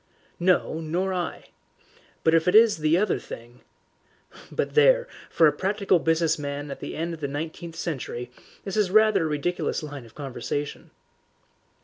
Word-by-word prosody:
"No, 175 -2 +2
nor 180 +4 -1
I. 180 -2 -4 0.7
But 160 - +4
if 165 +1 +3
it 180 - +3
is 225 -3 +7
the 155 +2 +2
other 210 +3 +1
thing 120 +1 -11 0.9
but - - -2
there, - - +5 0.2
for 165 - +4
a 150 - +6
practical 195 +2 +1
business 165 0 +1
man 145 0 -4
at - - -7
the - - -6
end 165 +2 -3
of 165 - -8
the 145 - -2
nineteenth 160 +3 -6
century 130 -7 -4 0.3
this 195 - -5
is 210 -3 +2
rather 215 -3 +4
a - - -1
ridiculous 155 +3 -1
line 145 -5 -8
of 115 - -20
conversation." 145 +1 -5
165 Hz, 160 wpm, -25 LUFS, 145-185 Hz, 0.9 s, is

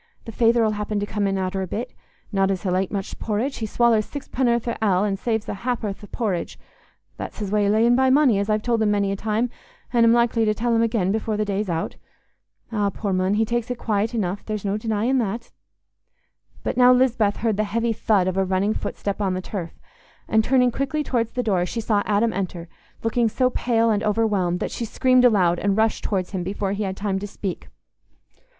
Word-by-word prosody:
The 225 - -6
feyther 230 +1 +3
'ull 215 - +2
happen 210 0 -2
come 205 -1 -1
in 195 0 0
arter 190 0 -2
a 190 - -3
bit. 240 +7 -4 0.4
Not 195 -2 +2
as 190 -2 -2
he'll 185 -2 0
ate 190 0 0
much 195 -2 -4
porridge. 230 +6 -2
He 220 - -3
swallers 225 -1 +2
sixpenn'orth 245 -4 -1
o' 235 - -1
ale, 190 -2 +3
an' 200 -2 0
saves 220 +2 -2
a - - -3
hap'orth 215 -2 -3
o' - - -9
por 225 -2 -2
ridge—that's 175 -2 -8
his 205 -3 -4
way 210 -1 +2
o' - - +2
layin' 230 +3 +4
by 260 +1 +3
money, 260 -6 +4
as 200 +2 -2
I've 215 0 +1
told 235 -2 +1
him 215 - +3
many 200 -1 +1
a - - -1
time, 220 +4 -1 0.4
an' 235 -1 +4
am 230 - +6
likely 235 -1 +3
to 215 -1 +1
tell 235 +2 0
him 225 - +3
again 215 -5 +1
afore 220 -1 -1
the 215 - 0
day's 200 0 -2
out. 165 -1 -3 0.7
Eh, 205 -2 +1
poor 200 -3 -2
mon, 185 +2 +1
he 220 +1 +2
takes 240 +1 -2
it 245 - -3
quiet 220 +1 -1
enough; 195 -3 -2
there's 215 -2 -4
no 200 0 0
denyin' 225 +4 0
that." 230 +1 -3 1.1
But - - -2
now 250 0 +7
Lisbeth 250 -5 +3
heard 220 -3 0
the 215 - +2
heavy 230 +3 0
"thud" 205 -4 +1
of 185 0 -1
a 195 - +3
running 190 +3 +1
footstep 200 -1 -4
on 190 -2 0
the - - -2
turf, 180 -3 -6 0.5
and, 220 0 +3
turning 250 0 +3
quickly 275 +4 -2
towards 230 -5 -1
the 250 - -1
door, 190 -6 +1
she 230 - -4
saw 215 -2 +1
Adam 215 +2 +2
enter, 180 -3 -4 0.4
looking 225 0 +1
so 255 +3 +1
pale 230 -2 +1
and 210 -1 +1
overwhelmed 205 -5 +1
that - - -2
she - - -4
screamed 255 +2 +3
aloud 180 -7 +4
and 200 0 0
rushed 220 0 +1
towards 185 -3 -1
him 190 -2 -2
before 195 +1 -2
he 200 +1 -3
had 190 0 -4
time 195 -1 -1
to 205 - -5
speak. 195 -2 -5
215 Hz, 220 wpm, -23 LUFS, 195-235 Hz, 1.1 s, now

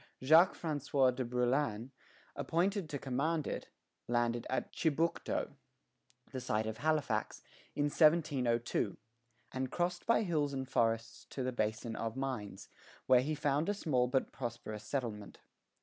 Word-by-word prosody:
Jacques 160 +7 +6
François 145 -4 +1
de 130 - -1
Brouillan, 125 -1 0 0.4
appointed 185 +1 0
to 145 - -3
command 140 +5 -1
it, - - -4 0.4
landed 120 0 0
at 130 - -2
Chibucto, 165 +1 0 0.8
the 130 - -4
site 110 -3 0
of 110 0 -4
Halifax, 155 +2 0 0.3
in 145 - +1
1702, 145 - +2 0.5
and 130 0 -3
crossed 175 0 -1
by 230 -1 +4
hills 150 -6 0
and 135 -1 -3
forests 115 -1 0
to 130 - -5
the 130 - -1
Basin 110 -1 -2
of 115 0 -3
Mines, 125 -8 -4 0.4
where 125 -1 +6
he 150 +4 -1
found 145 +4 +1
a 205 - +1
small 130 -10 +1
but 130 +1 0
prosperous 120 -4 -5
settlement. 110 -5 -4
130 Hz, 135 wpm, -34 LUFS, 120-155 Hz, 0.8 s, Jacques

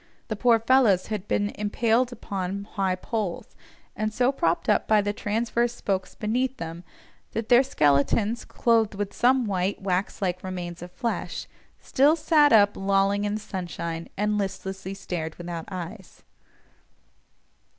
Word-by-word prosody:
The 215 - -1
poor 235 +2 +4
fellows 225 -5 +3
had 210 -1 -4
been 205 0 +1
impaled 230 +4 +1
upon 200 -4 -4
high 190 -3 0
poles, 200 -1 -4 0.4
and 215 0 -1
so 250 +4 +2
propped 170 -11 0
up 210 - +2
by 215 -1 +5
the 205 0 0
transverse 235 +3 -1
spokes 190 -5 -2
beneath 250 +5 -1
them, 165 +1 -6 0.5
that 225 0 -3
their 245 0 +7
skeletons, 205 - +2
clothed 225 -3 +1
with 200 0 -3
some 255 0 +3
white, 195 -1 -1
wax 190 0 -1
like 180 -2 -2
remains 175 -2 -5
of 175 0 -8
flesh, 235 +3 -3 0.3
still 285 +4 +3
sat 300 -2 +4
up 205 -2 +5
lolling 195 +1 +1
in 205 0 -1
the - - -3
sunshine, 170 -4 -5
and 210 +1 +1
listlessly 190 -1 -4
stared 170 -5 -5
without 170 -2 -6
eyes. 185 +2 -8
205 Hz, 145 wpm, -26 LUFS, 185-230 Hz, 0.5 s, their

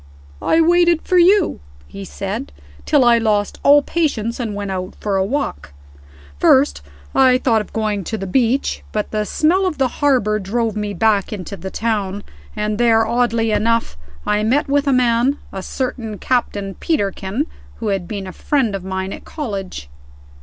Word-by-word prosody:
"I 325 - +2
waited 345 0 +3
for 365 - +3
you," 375 +1 +4 0.3
he 100 +7 -8
said, 70 -2 -5 0.4
"till 285 -4 +4
I 235 -1 +5
lost 210 -2 0
all 285 +1 +6
patience, 250 -10 -1
and 220 -4 -3
went 200 -1 -4
out 185 0 -4
for 205 -2 -1
a 190 - +2
walk. 190 - -3 0.7
First, 75 +1 +4 0.3
I 255 -1 +5
thought 230 -4 +2
of 210 - -10
going 215 -3 -1
to 220 - -3
the 195 - -5
beach, 245 +6 0
but 210 -1 -2
the 215 -1 -1
smell 370 +5 +2
of 335 - -3
the 265 -2 +2
harbor 245 -7 +2
drove 220 +2 -1
me 210 -1 -3
back 215 -3 +2
into 200 -1 -6
the 190 -1 -7
town; 205 -2 -2 0.3
and 210 +1 -2
there, 225 -2 +4
oddly 230 -1 +1
enough, 230 - +1 0.3
I 210 0 +1
met 255 +8 +1
with 285 +1 +1
a - - +4
man, 250 +2 +2 0.2
a 190 - -4
certain 230 -1 -4
Captain 205 -6 -1
Peterkin, 205 - -1 0.3
who 220 - -3
had 195 -3 -2
been 200 -3 -5
a 185 - -8
friend 265 -8 0
of 195 -2 -4
mine 190 0 -3
at - - -9
college." 195 - -5
220 Hz, 175 wpm, -19 LUFS, 200-260 Hz, 0.7 s, all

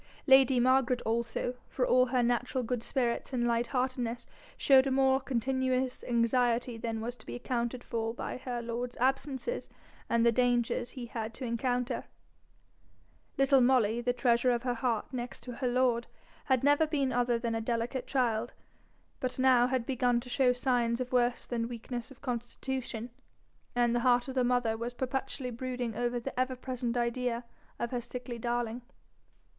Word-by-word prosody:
Lady 265 -2 +6
Margaret 255 0 +3
also, 235 +2 -1 0.2
for 250 - 0
all 255 0 +4
her 250 -1 +1
natural 245 +2 0
good 240 0 -2
spirits 245 +1 -1
and 240 -2 +1
light 235 0 +1
heartedness, 250 -2 -2 0.3
showed 270 -1 +5
a - - +1
more 265 0 +4
continuous 260 0 -1
anxiety 240 0 +1
than 225 -1 -3
was 240 +2 -4
to 220 - -16
be - - -7
accounted 245 0 -2
for 225 -1 -2
by 240 - -5
her 245 -2 -4
lord's 240 +1 -4
absences 270 - -1 0.4
and 235 0 +3
the 235 - +6
dangers 245 0 +1
he 250 -2 -7
had 225 -1 -5
to 260 - -5
encounter: 245 +1 -1 1.3
little 275 -1 +5
Molly, 240 -3 +3
the 245 +1 +1
treasure 245 0 +2
of 240 -1 +1
her 250 -1 0
heart 235 0 -1
next 245 -1 -5
to 245 -2 -7
her 260 - -1
lord, 245 -1 +2 0.4
had 260 -2 +2
never 290 +3 +4
been 280 -4 0
other 245 -1 +2
than 230 0 -2
a 225 - -1
delicate 235 +3 -2
child, 240 -3 0 0.7
but 255 0 -2
now 255 -2 +5
had 255 -2 -1
begun 245 -2 +1
to 250 - -11
show 255 0 +3
signs 245 -2 +1
of 250 -1 -3
worse 245 -1 +2
than 230 -2 -2
weakness 240 +1 -6
of 270 - -15
constitution, 245 -1 -4 0.6
and 240 -1 +3
the 240 - +2
heart 245 0 +3
of 265 - -4
the 255 -1 +2
mother 245 -2 +2
was 235 +2 -5
perpetually 260 0 -3
brooding 245 -1 -4
over 240 +1 -1
the 255 +1 -5
ever 255 0 +1
present 250 -1 -3
idea 240 0 -1 0.3
of 235 - -3
her 245 -2 -1
sickly 245 0 -7
darling. 240 0 -2
245 Hz, 170 wpm, -31 LUFS, 235-255 Hz, 1.3 s, Lady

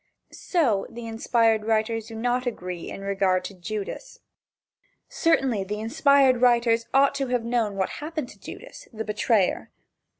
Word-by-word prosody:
So, 250 - 0
the 235 0 -8
inspired 225 -1 +1
writers 225 0 0
do 225 - -9
not 245 +2 -1
agree 180 -7 -5
in - - -7
regard 195 -2 +1
to 200 - -6
Judas. 210 - -6 0.9
Certainly 265 -11 +1
the 210 +2 -4
inspired 270 +1 +3
writers 235 -2 +3
ought 275 +1 +4
to 275 -1 -2
have 245 -2 0
known 230 -4 0
what 190 -1 -1
happened 310 -3 -4
to - - -15
Judas, - - -11
the 220 -1 -5
betrayer. 210 -2 +1
230 Hz, 145 wpm, -25 LUFS, 210-255 Hz, 0.9 s, ought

